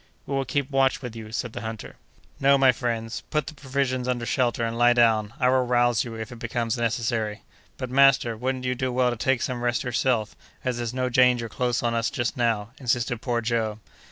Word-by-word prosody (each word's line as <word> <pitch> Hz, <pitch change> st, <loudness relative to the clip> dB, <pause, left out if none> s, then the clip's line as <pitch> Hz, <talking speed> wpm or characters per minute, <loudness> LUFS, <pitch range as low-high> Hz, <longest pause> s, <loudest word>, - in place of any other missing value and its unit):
"We 140 Hz, -, -5 dB
will 135 Hz, 0 st, 0 dB
keep 140 Hz, +2 st, -2 dB
watch 135 Hz, 0 st, +2 dB
with 120 Hz, -2 st, -6 dB
you," 110 Hz, -1 st, -8 dB
said 115 Hz, +1 st, -3 dB
the -, -, -5 dB
hunter. 110 Hz, -1 st, -7 dB, 0.4 s
"No, 140 Hz, +1 st, +5 dB
my 135 Hz, -1 st, +6 dB
friends, 115 Hz, -2 st, -3 dB
put 150 Hz, -1 st, 0 dB
the -, -, -7 dB
provisions 130 Hz, -3 st, -2 dB
under 120 Hz, -2 st, -1 dB
shelter, 120 Hz, -1 st, 0 dB
and 115 Hz, 0 st, -3 dB
lie 120 Hz, +1 st, +5 dB
down; 110 Hz, -3 st, +3 dB
I 125 Hz, -, +3 dB
will 130 Hz, 0 st, +3 dB
rouse 120 Hz, -2 st, +2 dB
you, 115 Hz, -2 st, -7 dB
if 110 Hz, +2 st, -6 dB
it 120 Hz, -, -9 dB
becomes 115 Hz, -1 st, -2 dB
necessary." 115 Hz, -2 st, -1 dB, 0.3 s
"But, 130 Hz, -2 st, -5 dB
master, 135 Hz, -3 st, +4 dB
wouldn't 130 Hz, +2 st, -3 dB
you 125 Hz, -, +1 dB
do 130 Hz, 0 st, -2 dB
well 125 Hz, 0 st, +2 dB
to -, -, -2 dB
take 130 Hz, +2 st, +1 dB
some 125 Hz, -2 st, -3 dB
rest 120 Hz, -1 st, 0 dB
yourself, 120 Hz, -3 st, 0 dB, 0.3 s
as 125 Hz, -2 st, -1 dB
there's 120 Hz, -1 st, -3 dB
no 130 Hz, 0 st, -1 dB
danger 125 Hz, -1 st, +3 dB
close 120 Hz, +2 st, -1 dB
on 120 Hz, -1 st, +1 dB
us 115 Hz, 0 st, 0 dB
just 120 Hz, 0 st, -2 dB
now?" 115 Hz, -3 st, 0 dB
insisted 120 Hz, -2 st, -1 dB
poor 120 Hz, -3 st, -1 dB
Joe. 110 Hz, -2 st, -1 dB
120 Hz, 215 wpm, -25 LUFS, 115-130 Hz, 0.4 s, my